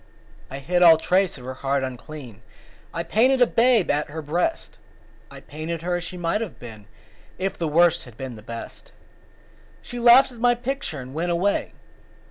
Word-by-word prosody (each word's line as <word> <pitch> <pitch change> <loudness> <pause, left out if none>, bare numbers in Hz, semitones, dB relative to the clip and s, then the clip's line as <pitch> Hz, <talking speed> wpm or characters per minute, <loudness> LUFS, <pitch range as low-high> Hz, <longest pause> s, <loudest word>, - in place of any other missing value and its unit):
I 135 - -6
hid 175 +6 -1
all 165 -2 +8
trace 185 +2 +1
of 125 - -12
her 130 - -5
heart 140 0 0
unclean; 130 -3 -8 0.5
I 170 - -3
painted 250 +9 +2
a 245 - +6
babe 235 -4 +3
at 145 +1 -1
her 160 +1 -6
breast; 160 +5 -2 0.5
I - - -12
painted 155 +4 -6
her 175 0 -1
as 175 - -6
she 180 +1 -7
might 175 +4 -1
have 220 -6 -6
been 110 -4 -11 0.5
If 190 +1 -2
the 165 - -3
Worst 170 +2 +3
had 120 -3 -15
been 130 -3 -6
the 110 - -12
Best. 115 +2 -9 0.9
She 245 - -7
laughed 245 +3 +6
at 240 - -13
my 240 +1 +3
picture 255 - -4
and 130 +1 -9
went 165 +4 -2
away. 185 +4 0
170 Hz, 185 wpm, -23 LUFS, 140-200 Hz, 0.9 s, all